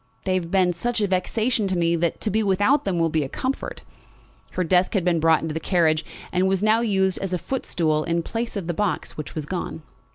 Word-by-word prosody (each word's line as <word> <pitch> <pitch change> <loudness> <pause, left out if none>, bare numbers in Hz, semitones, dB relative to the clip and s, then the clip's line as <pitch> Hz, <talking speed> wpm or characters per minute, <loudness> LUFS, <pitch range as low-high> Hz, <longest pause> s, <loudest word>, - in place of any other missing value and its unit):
They 185 - 0
have 180 -3 -1
been 185 -1 +3
such 235 +7 -2
a 210 - +2
vexation 210 +4 0
to 190 -1 -1
me 170 0 +2
that 170 -1 0
to 215 - -1
be 220 +3 +2
without 205 +8 +2
them 190 -3 0
will 165 -1 +1
be 155 -1 +1
a 135 - -5
comfort." 260 - -4 0.7
Her 185 - 0
desk 180 +4 +2
had 185 -3 +1
been 175 -2 +2
brought 160 0 +3
into 160 -1 -3
the 160 - -2
carriage 160 -2 +2 0.3
and 185 +1 +2
was 190 +1 +1
now 215 +1 +4
used 190 -4 +1
as 195 -2 -3
a - - +2
foot 265 +9 -4
stool 155 -3 +1
in 170 +1 -1
place 230 +2 -3
of 195 - -4
the 175 - -2
box 205 +2 -2
which 155 - -7
was 155 -2 -3
gone. 160 -1 -4
180 Hz, 245 wpm, -23 LUFS, 165-205 Hz, 0.7 s, now